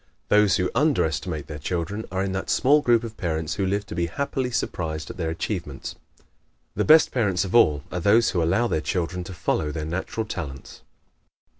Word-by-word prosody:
Those 105 -2 +5
who 90 -1 0
under 145 - +3
estimate 80 -1 -3
their 75 0 -7
children 90 +7 -3
are 95 +1 -1
in 100 - -2
that 95 0 -4
small 145 +3 +4
group 120 -4 +3
of 115 -1 -7
parents 80 -4 -2
who 100 -2 -1
live 100 +2 -1
to - - -8
be 85 0 -1
happily 130 +6 -2
surprised 80 -9 -3
at - - -12
their 80 -3 -2
achievements. 80 -4 -4 0.8
The - - +1
best 155 +1 +6
parents 100 -6 +1
of 95 - -6
all 75 - +4
are 90 - -2
those 110 +6 +4
who 90 - 0
allow 95 +9 +2
their 80 - -1
children 90 +1 -2
to 95 - -8
follow 75 -3 -1
their 75 -1 -4
natural 95 +7 -3
talents. 75 -10 -7
90 Hz, 195 wpm, -24 LUFS, 80-110 Hz, 0.8 s, best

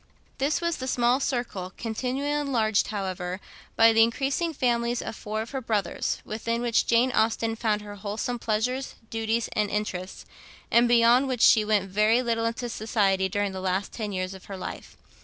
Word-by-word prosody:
This 285 +4 +1
was 340 -1 -1
the 260 - -5
small 245 0 +2
circle, 240 -9 -3
continually 255 +5 -2
enlarged, 245 -8 +1
however, 185 -3 -4 0.4
by 225 0 +6
the 225 - +5
increasing 275 +8 +1
families 240 -4 0
of - - -5
four 215 +1 -4
of 230 - -12
her 270 -2 -3
brothers, 210 -6 -2
within 230 +2 -2
which 235 -1 +2
Jane 235 +2 +3
Austen 225 0 +1
found 215 -2 0
her 205 0 -8
wholesome 210 +4 -4
pleasures, 245 +5 -1 0.2
duties, 225 0 -1
and 210 -1 0
interests, 190 -3 -4 0.5
and 235 +1 +5
beyond 240 +3 +5
which 255 -3 -2
she 215 - +7
went 210 -2 +1
very 215 +5 +3
little 230 -1 0
into 230 +1 -2
society 200 -4 +1
during 205 +1 -1
the 190 0 -6
last 190 +1 -1
ten 215 -3 -4
years 185 0 -3
of 190 - -12
her 195 - -7
life. 185 - -8
225 Hz, 175 wpm, -26 LUFS, 205-245 Hz, 0.5 s, she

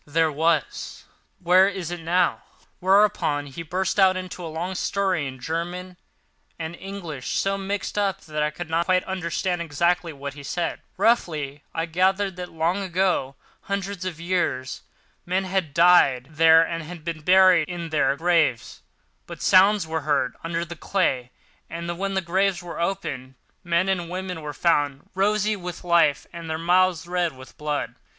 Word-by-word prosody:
"There 160 +1 +2
was." 160 +2 -1 0.3
"Where 185 +2 +5
is 185 -4 -4
it 175 - -4
now?" 175 +2 +1 0.4
Whereupon 190 -6 +3
he 145 +4 -8
burst 185 +5 -1
out 190 -1 +5
into 185 -1 -6
a - - -4
long 170 +4 -4
story 185 -5 0
in 130 -1 -8
German 175 +5 -4 0.6
and 160 +1 -5
English, 175 -9 -5
so 195 0 +1
mixed 200 +1 -3
up 200 -2 0
that 155 -1 -4
I 150 - +2
could 160 +2 -7
not 165 +1 0
quite 185 0 +3
understand 180 -1 -2
exactly 170 +2 0
what 140 -1 -7
he 145 - -10
said, 170 +4 -3 0.2
but - - -4
roughly 155 -11 +1
I 165 - -2
gathered 190 +3 +1
that 180 -1 -6
long 165 +4 0
ago, 180 -7 0 0.3
hundreds 200 -1 -4
of 180 -4 -5
years, 170 -7 -1 0.4
men 185 +2 0
had 185 -5 -1
died 150 -6 +5
there 160 +1 +6
and 165 0 -6
been 165 -2 -4
buried 185 -1 +5
in 170 -2 -5
their 140 -3 +2
graves; 160 -8 +1 0.5
and - - -8
sounds 195 0 +5
were 160 0 -3
heard 145 -4 0
under 165 +1 -2
the 170 0 -8
clay, 135 -9 0 0.4
and 170 +1 -4
when 195 0 -2
the 190 - +1
graves 185 +1 0
were 170 -1 -6
opened, 145 -8 -3 0.3
men 175 +1 +1
and 180 -3 -1
women 180 -2 -5
were 150 -1 -5
found 145 -4 0
rosy 210 +2 +1
with 180 -2 -7
life, 170 -5 +3
and 170 -1 -7
their 160 - -1
mouths 175 0 +2
red 175 -1 -1
with 130 0 -14
blood. 150 -1 -3
170 Hz, 165 wpm, -24 LUFS, 155-185 Hz, 0.6 s, there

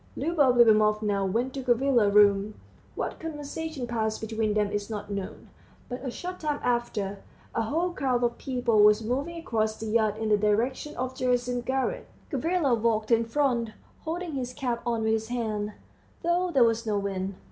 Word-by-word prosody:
Liubov 290 -7 +2
Liubimovna 215 -3 +4
went 245 +5 -1
to 275 - -4
Gavrila's 245 -3 +3
room. 205 0 +4 0.4
What - - -4
conversation 315 -2 -5
passed 220 -2 -1
between 220 -1 -1
them 210 -1 +1
is 205 0 -3
not 205 -2 -5
known, 200 -1 -6 0.4
but 250 +1 -5
a 265 - -2
short 360 +8 -6
time 300 -2 -1
after, 220 -5 -1 0.3
a - - 0
whole 325 +11 0
crowd 255 -7 0
of 235 0 0
people 245 -4 +1
was 210 +1 +5
moving 275 +9 -2
across 220 -8 -1
the 225 - -6
yard 215 -1 +1
in 220 0 -2
the 210 - +5
direction 225 +8 0
of 255 0 -2
Gerasim's 245 -1 0
garret. 270 - -1 0.2
Gavrila 315 0 +1
walked 220 -1 +1
in 230 0 +4
front, 235 -3 0 0.3
holding 340 +2 -4
his 255 -2 -3
cap 245 -4 -2
on 230 -2 0
with 220 - +2
his 220 0 -1
hand, 215 -3 -2 0.5
though 350 +2 +1
there 270 -7 +4
was 230 0 +2
no 210 -1 +1
wind. 195 -1 -3
235 Hz, 175 wpm, -27 LUFS, 215-270 Hz, 0.5 s, was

